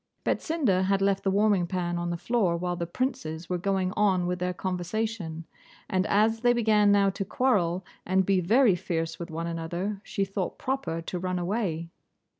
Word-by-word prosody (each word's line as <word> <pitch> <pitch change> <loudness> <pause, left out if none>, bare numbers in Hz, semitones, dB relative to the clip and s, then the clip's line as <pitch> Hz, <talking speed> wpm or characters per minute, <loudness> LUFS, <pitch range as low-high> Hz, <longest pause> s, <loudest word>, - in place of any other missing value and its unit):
Betsinda 245 - +1
had 195 0 +2
left 195 0 +2
the 195 - +2
warming 200 -2 +3
pan 175 -1 -2
on 175 0 -2
the 170 - -2
floor 195 -4 +1
while 175 +1 -2
the 170 -1 -3
princes 175 - -3
were 180 - 0
going 190 -1 0
on 190 -4 +2
with 180 0 -2
their 180 0 0
conversation, 180 -1 -3 0.4
and 185 +1 0
as 220 +2 +3
they 240 +1 +4
began 215 -3 +4
now 200 -1 +4
to 195 - -3
quarrel 190 -6 +1 0.2
and 190 +1 +2
be 195 0 +3
very 220 +5 +4
fierce 165 -2 -3
with 170 - -6
one 165 +1 -4
another, 170 +4 -3
she 195 - -1
thought 195 -1 -3
proper 260 -11 -2
to 180 +2 -4
run 185 0 -2
away. 175 -3 -2
185 Hz, 185 wpm, -27 LUFS, 175-210 Hz, 0.4 s, they